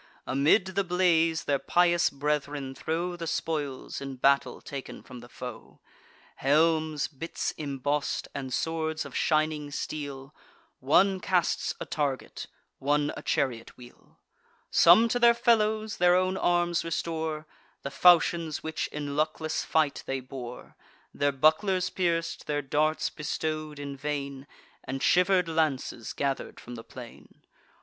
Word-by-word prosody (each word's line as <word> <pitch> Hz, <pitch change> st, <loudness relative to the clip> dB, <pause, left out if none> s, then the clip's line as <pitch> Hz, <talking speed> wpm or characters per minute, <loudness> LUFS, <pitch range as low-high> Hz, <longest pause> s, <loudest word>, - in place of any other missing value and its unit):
Amid 145 Hz, +9 st, +3 dB
the 200 Hz, +1 st, +1 dB
blaze, 170 Hz, -3 st, +2 dB
their 140 Hz, -1 st, 0 dB
pious 175 Hz, +1 st, +3 dB
brethren 145 Hz, -1 st, -2 dB
throw 170 Hz, +6 st, -3 dB
The 170 Hz, -1 st, -6 dB
spoils, 145 Hz, -5 st, -3 dB
in 135 Hz, -1 st, -6 dB
battle 135 Hz, 0 st, +2 dB
taken 140 Hz, -2 st, -8 dB
from 125 Hz, -1 st, -11 dB
the 120 Hz, +1 st, -13 dB
foe: 125 Hz, -2 st, -9 dB, 0.6 s
Helms, 155 Hz, 0 st, +2 dB
bits 160 Hz, +3 st, -4 dB
emboss'd, 145 Hz, 0 st, -2 dB
and 135 Hz, -2 st, -5 dB
swords 160 Hz, +3 st, -2 dB
of -, -, -10 dB
shining 155 Hz, -1 st, +1 dB
steel; 145 Hz, -1 st, -6 dB, 0.5 s
One 185 Hz, +8 st, +3 dB
casts 180 Hz, -2 st, 0 dB
a -, -, -5 dB
target, 140 Hz, -4 st, -3 dB, 0.3 s
one 145 Hz, +1 st, +1 dB
a -, -, -7 dB
chariot 120 Hz, -4 st, -2 dB
wheel; 120 Hz, -1 st, -16 dB, 0.5 s
Some 180 Hz, +8 st, +7 dB
to 245 Hz, -, 0 dB
their 235 Hz, 0 st, +6 dB
fellows 220 Hz, -2 st, +2 dB
their 180 Hz, 0 st, +5 dB
own 185 Hz, +1 st, +1 dB
arms 175 Hz, -2 st, +1 dB
restore: 160 Hz, -1 st, -3 dB, 0.4 s
The 140 Hz, -, -4 dB
falchions 170 Hz, -1 st, +4 dB
which 160 Hz, 0 st, -2 dB
in 145 Hz, -1 st, -5 dB
luckless 155 Hz, +1 st, -1 dB
fight 155 Hz, -3 st, +1 dB
they 135 Hz, 0 st, -1 dB
bore, 125 Hz, -1 st, -9 dB, 0.4 s
Their 145 Hz, 0 st, +1 dB
bucklers 180 Hz, +6 st, +2 dB
pierc'd, 170 Hz, -2 st, -1 dB
their 145 Hz, -1 st, -1 dB
darts 155 Hz, +3 st, 0 dB
bestow'd 155 Hz, 0 st, -4 dB
in 140 Hz, -1 st, -6 dB
vain, 140 Hz, -1 st, -4 dB, 0.4 s
And 135 Hz, 0 st, -4 dB
shiver'd 180 Hz, 0 st, +4 dB
lances 155 Hz, -7 st, -1 dB
gather'd 140 Hz, -1 st, -3 dB
from 120 Hz, -, -10 dB
the 115 Hz, -1 st, -8 dB
plain. 120 Hz, -1 st, -13 dB
155 Hz, 135 wpm, -28 LUFS, 140-170 Hz, 0.6 s, Some